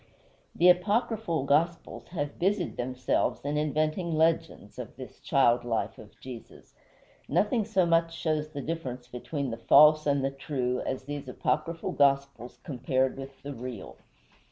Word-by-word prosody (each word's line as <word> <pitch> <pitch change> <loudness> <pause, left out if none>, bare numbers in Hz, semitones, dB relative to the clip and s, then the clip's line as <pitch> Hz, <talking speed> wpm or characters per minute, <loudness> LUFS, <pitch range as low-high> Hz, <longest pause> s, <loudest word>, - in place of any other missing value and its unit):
The 175 - +4
apocryphal 200 - +2
gospels 165 +5 0
have 145 -5 -4
busied 190 -1 0
themselves 125 +1 -1
in 145 +1 -1
inventing 155 +3 0
legends 160 +1 0
of - - -7
this - - -10
child 120 -3 +3
life 115 -2 -2
of 105 -2 -15
Jesus. 125 -3 -11 0.6
Nothing 205 - +2
so 195 -4 +2
much 165 0 +2
shows 155 -1 -1
the 145 -3 -6
difference 130 -7 -5
between 130 +2 -4
the 115 - -4
false 150 +5 +6
and 140 -1 +2
the 135 - 0
true 130 -3 -2
as 130 0 -3
these 145 0 -6
apocryphal 165 +5 -2
gospels 140 -3 +1
compared 130 -3 0
with 135 0 -10
the 145 0 -5
real. 120 - -8
145 Hz, 145 wpm, -28 LUFS, 130-165 Hz, 0.6 s, false